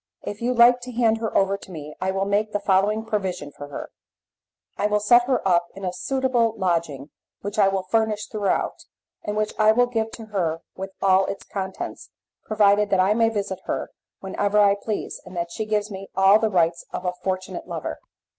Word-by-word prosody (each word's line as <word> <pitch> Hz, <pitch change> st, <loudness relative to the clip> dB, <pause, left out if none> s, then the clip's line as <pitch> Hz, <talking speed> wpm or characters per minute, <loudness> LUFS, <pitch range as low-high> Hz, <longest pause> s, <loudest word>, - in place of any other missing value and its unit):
If 205 Hz, +2 st, -6 dB
you 250 Hz, +1 st, 0 dB
like 240 Hz, +1 st, +7 dB
to 250 Hz, +1 st, -7 dB
hand 225 Hz, -2 st, +2 dB
her 225 Hz, -1 st, -1 dB
over 195 Hz, 0 st, +2 dB
to 200 Hz, -, -14 dB
me 150 Hz, -4 st, -8 dB
I 185 Hz, -, 0 dB
will 195 Hz, +1 st, 0 dB
make 210 Hz, +2 st, 0 dB
the 205 Hz, -, +1 dB
following 205 Hz, +3 st, +2 dB
provision 185 Hz, -8 st, -3 dB
for 145 Hz, -, -9 dB
her: 145 Hz, -, -7 dB, 0.8 s
I 205 Hz, -, +1 dB
will 210 Hz, 0 st, +2 dB
set 240 Hz, +4 st, +5 dB
her 255 Hz, -6 st, 0 dB
up 175 Hz, -2 st, +3 dB
in 195 Hz, 0 st, -6 dB
a 180 Hz, -, -2 dB
suitable 250 Hz, -1 st, 0 dB
lodging 165 Hz, -7 st, -1 dB, 0.3 s
which 205 Hz, +2 st, -4 dB
I 200 Hz, -, +6 dB
will 195 Hz, -1 st, 0 dB
furnish 215 Hz, +2 st, 0 dB
throughout, 210 Hz, -3 st, -2 dB, 0.4 s
and 210 Hz, 0 st, -3 dB
which 215 Hz, 0 st, 0 dB
I 215 Hz, 0 st, +6 dB
will 245 Hz, +2 st, +4 dB
give 225 Hz, -2 st, -2 dB
to 225 Hz, -, -8 dB
her 165 Hz, -4 st, -1 dB
with 190 Hz, +1 st, -5 dB
all 190 Hz, 0 st, +4 dB
its 195 Hz, -, -5 dB
contents, 190 Hz, -2 st, -6 dB, 0.3 s
provided 210 Hz, -1 st, +3 dB
that 195 Hz, -, +2 dB
I 190 Hz, +3 st, +4 dB
may 225 Hz, 0 st, +3 dB
visit 200 Hz, -4 st, -3 dB
her -, -, -3 dB, 0.3 s
whenever 200 Hz, +2 st, -1 dB
I 205 Hz, -1 st, +6 dB
please, 205 Hz, +1 st, -4 dB
and 185 Hz, -1 st, -10 dB
that 170 Hz, 0 st, -2 dB
she 220 Hz, -, -3 dB
gives 210 Hz, 0 st, 0 dB
me 195 Hz, 0 st, -7 dB
all 195 Hz, +2 st, +6 dB
the 220 Hz, -, +1 dB
rights 170 Hz, -3 st, +1 dB
of 180 Hz, -, -5 dB
a 180 Hz, -, 0 dB
fortunate 185 Hz, -1 st, -3 dB
lover. -, -, -5 dB
200 Hz, 205 wpm, -24 LUFS, 190-220 Hz, 0.8 s, like